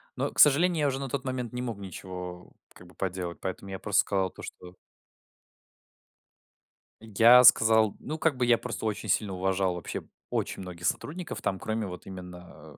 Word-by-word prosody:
Но, - - -2
к - - -7
сожалению, 160 +3 +5
я 145 - +2
уже 135 -1 -2
на 135 -1 -5
тот 135 +1 -3
момент 125 -2 -4
не 125 - -4
мог 120 -4 -4
ничего 90 -2 -8 0.2
как 90 - -15
бы 90 - -19
поделать, 90 -2 -4
поэтому 95 +1 -5
я 95 - -5
просто 100 -1 +2
сказал 95 -2 -1
то, - - -13
что 90 0 -10 2.3
Я 115 +3 +6
сказал, 110 -3 +6
ну, 155 +3 -5
как 160 -4 +1
бы 125 - +1
я 120 -1 +4
просто 115 -2 -5
очень 110 -2 -3
сильно 105 -3 +1
уважал 95 0 0
вообще 90 - -5 0.3
очень - - -3
многих 90 -2 -8
сотрудников 175 +3 -4
там, 95 - -2
кроме 110 -1 -3
вот 90 -1 -9
именно, 90 -5 -11
100 Hz, 180 wpm, -28 LUFS, 90-125 Hz, 2.3 s, Я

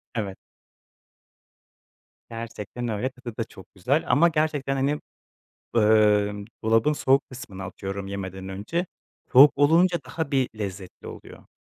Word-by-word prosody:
Evet. 100 -4 -3 1.9
Gerçekten 115 +1 -6
öyle. 115 +3 -1
Tadı 125 -3 -10
da 115 - 0
çok 95 -3 -15
güzel 130 - +1
ama 145 +7 +5
gerçekten, 150 -3 0
hani, 140 +2 0 0.8
ımm, 105 -2 +3 0.2
dolabın 115 +6 +3
soğuk 135 -1 +2
kısmına 100 -7 -8
atıyorum 95 +1 -6
yemeden 95 -1 -6
önce, 105 - -3 0.5
soğuk 140 +3 +9
olunca 170 +5 +4
daha 160 -3 -4
bir 135 -3 +2
lezzetli 95 -3 -7
oluyor. - - -11
115 Hz, 120 wpm, -25 LUFS, 100-140 Hz, 1.9 s, soğuk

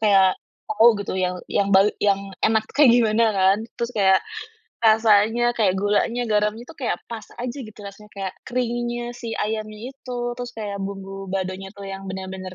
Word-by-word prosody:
kayak 195 -3 +4 0.3
tau 225 +2 +6
gitu 200 -2 -3
yang 180 0 0 0.2
yang 200 - +2
bae 195 +2 +6
yang 195 -1 +1
enak 220 0 +2
kayak 290 -2 +6
gimana 225 -1 +3
kan. 190 +1 +4 0.2
Terus 235 +1 -3
kayak 190 -3 +4 0.6
rasanya, 220 +1 +4
kayak 205 -6 +1
gulanya, 210 +4 +1
garamnya 210 +1 0
itu - - -11
kayak 275 -6 -2
pas 230 -2 -7
aja 245 +1 -4
gitu 215 -3 -10
rasanya, 200 +1 -11
kayak 190 -1 -3 0.2
keringnya 240 -1 -2
si 235 -1 -7
ayamnya 215 +3 -4
itu. 250 -2 -7 0.2
Terus 245 0 -6
kayak 205 -2 -4
bumbu 195 0 -6
baladonya 190 0 -3
itu 200 0 -11
yang 195 0 -6
bener-bener 190 0 -6
210 Hz, 165 wpm, -23 LUFS, 195-235 Hz, 0.6 s, tau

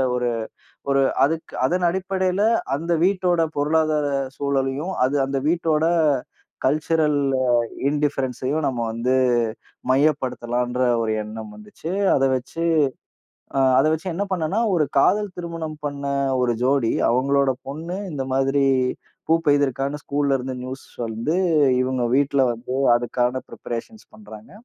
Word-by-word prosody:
ஒரு 125 -1 0 0.6
ஒரு 135 0 +3 0.2
அதுக் 160 +2 -4
அதன் 180 +3 +1
அடிப்படையில 190 +1 -1 0.3
அந்த 165 +3 -4
வீட்டோட 180 -3 +2 0.2
பொருளாதார 155 0 +1 0.3
சூழலையும், 140 +5 -1
அது 140 +2 0
அந்த 135 0 -2
வீட்டோட 160 -2 +1 0.8
கல்சுரல் 150 +1 +2 0.7
இண்டிஃபரன்ஸ்ஸயும் 145 0 -1
நம்ம 125 -3 -2
வந்து 120 +3 -1 0.8
மையப்படுத்தலாம்ன்ற 125 -3 0 0.2
ஒரு 110 -1 -1
எண்ணம் 110 0 -8
வந்துச்சு. 105 +11 -8 0.2
அத 135 - +3
வெச்சு 130 +6 -4 0.9
அ - - +4 0.2
அத 145 +4 +4
வச்சு 160 +4 -2
என்ன 200 +4 -1
பண்ணேன்னா, 180 +4 0
ஒரு 155 -4 +3
காதல் 205 +8 +3
திருமணம் 165 -3 -5
பண்ண 140 -1 -4 0.4
1 120 -1 +2
ஜோடி 130 -3 +2 0.2
அவங்களோட 135 +2 +2 0.2
பொண்ணு 165 +6 -5
இந்த 135 -3 -3
மாதிரி 135 +1 +2 0.7
பூப்பெபய்துர்க்கான்னு 145 -3 +1
ஸ்கூல்ல 140 -1 0
இருந்து 130 0 -5
நியூஸ் 130 +1 -7 0.2
வந்து 115 +9 -2 0.5
இவங்க 130 -1 -1
வீட்ல 140 -1 +2
வந்து 120 +2 -6 0.2
அதுக்கான 125 +1 -1
ப்ரிபரேஷன்ஸ் 120 - -7
பண்றாங்க. 110 0 -13
140 Hz, 115 wpm, -22 LUFS, 130-160 Hz, 0.9 s, அ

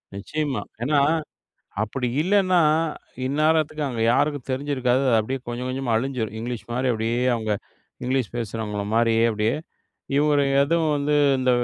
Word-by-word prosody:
நிச்சயமா 145 +7 -2 0.2
ஏன்னா, 145 +3 +3 0.8
அப்டி 125 +4 -2
இல்லன்னா 185 -1 +3 0.7
இந்நேரத்துக்கு 155 +2 +1
அங்க 120 -3 -4
யாருக்கும் 145 -1 0
தெரிஞ்சிருக்காது. 130 -1 0
அது 115 -3 +4
அப்டியே 130 +5 -3
கொஞ்சம் 120 +1 -4
கொஞ்சமா 130 -3 -1
அழிஞ்சிடும், 115 -4 -2
இங்கிலீஷ் 120 0 -5
மாரி 125 +2 0
அப்டியே 115 +2 -1 0.2
அவங்க 110 -2 -2 0.5
இங்கிலீஷ் 130 -3 -1
பேசுறவங்கள 110 -2 -3
மாரியே 115 -1 +3
அப்டியே, 110 +1 0 0.6
இவரு 145 -1 +3 0.2
எதுவும் 160 +1 +1
வந்து 145 +1 0 0.2
இந்த 130 0 +2
130 Hz, 130 wpm, -24 LUFS, 115-145 Hz, 0.8 s, அது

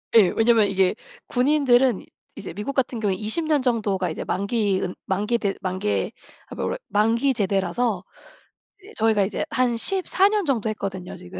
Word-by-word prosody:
예. 215 -5 +8
왜냐면 225 -2 +4
이게 190 -1 +2 0.3
군인들은 260 -2 +3 0.3
이제 - - -7
미국 210 +7 -4
같은 250 -3 -1
경우에 205 -3 0
20 220 - -2
년 300 -3 +2
정도가 205 -8 0
이제 160 - -5
만기 200 -1 0
은 180 - -3
만기 210 +5 0
대 200 -4 -1
만개 190 +2 -1 0.4
아 - - -9
뭐래 - - -2
만기 230 +6 +2
제대라서 195 0 0 0.8
이제 410 +3 -15
저희가 220 -2 +2
이제 200 - -3
한 250 -2 +1
14 385 +5 +2
년 415 -3 0
정도 230 -6 0
했거든요 195 -4 -5
지금. 90 +1 -10
220 Hz, 310 characters per minute, -23 LUFS, 195-250 Hz, 0.8 s, 예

